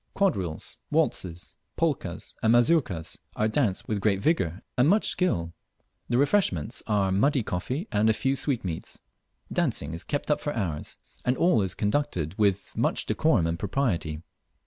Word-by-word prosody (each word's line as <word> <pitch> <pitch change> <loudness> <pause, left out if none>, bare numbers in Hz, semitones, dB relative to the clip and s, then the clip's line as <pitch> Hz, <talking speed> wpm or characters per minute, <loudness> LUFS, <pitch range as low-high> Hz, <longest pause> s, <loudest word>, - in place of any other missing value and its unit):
Quadrilles, 95 - -1
waltzes, 85 -2 -1 0.2
polkas, - - -1
and 110 +1 +4
mazurkas 120 - +2 0.2
are 110 - +2
danced 110 -4 0
with 105 -3 -1
great 100 -2 +2
vigour 95 - 0
and 130 +4 +4
much 210 +3 +3
skill. 85 - 0 0.6
The 120 - +2
refreshments 140 - +1
are 100 -3 +2
muddy 130 +7 +2
coffee 125 - -3
and 105 +2 +3
a - - +5
few 135 +4 0
sweetmeats. 120 - -3 0.5
Dancing 75 +2 0
is 85 - -5
kept 145 +1 -2
up 150 - +1
for 145 - -3
hours, 85 -9 -3 0.3
and 125 +1 +1
all 170 -11 +4
is 95 -2 -1
conducted 105 - -1
with 100 -2 +1
much - - +1
decorum 120 - +2
and 85 +1 -1
propriety. 90 - -1
105 Hz, 150 wpm, -27 LUFS, 90-140 Hz, 0.6 s, a